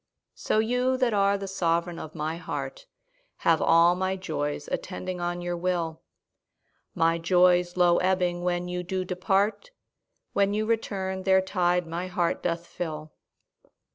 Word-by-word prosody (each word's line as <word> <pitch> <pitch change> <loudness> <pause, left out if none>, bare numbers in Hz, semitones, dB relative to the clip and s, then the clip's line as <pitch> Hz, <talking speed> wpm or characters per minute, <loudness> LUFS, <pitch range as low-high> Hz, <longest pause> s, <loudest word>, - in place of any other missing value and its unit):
So - - -1
you 250 +4 +1
that 250 -3 +1
are 200 0 +3
the 195 0 -6
sovereign 170 -2 -1
of 155 - -8
my 160 +1 -3
heart - - -6 0.6
Have 165 -1 +4
all 170 +1 +5
my 190 +1 -1
joys 150 -6 -3
attending 185 -1 -4
on 175 0 -2
your 175 0 -2
will; 170 -2 -2 0.9
My 165 0 +2
joys 180 +1 +3
low 175 -1 +5
ebbing 180 -1 +1
when 175 0 -1
you 180 0 -3
do 185 +1 -3
depart, 195 - 0 0.6
When 200 0 +2
you 215 +1 0
return 195 -4 -2
their 190 0 +4
tide 180 -2 +1
my 170 +2 -4
heart 175 -2 -1
doth 170 0 -2
fill. 155 -3 -6
180 Hz, 145 wpm, -27 LUFS, 170-190 Hz, 0.9 s, all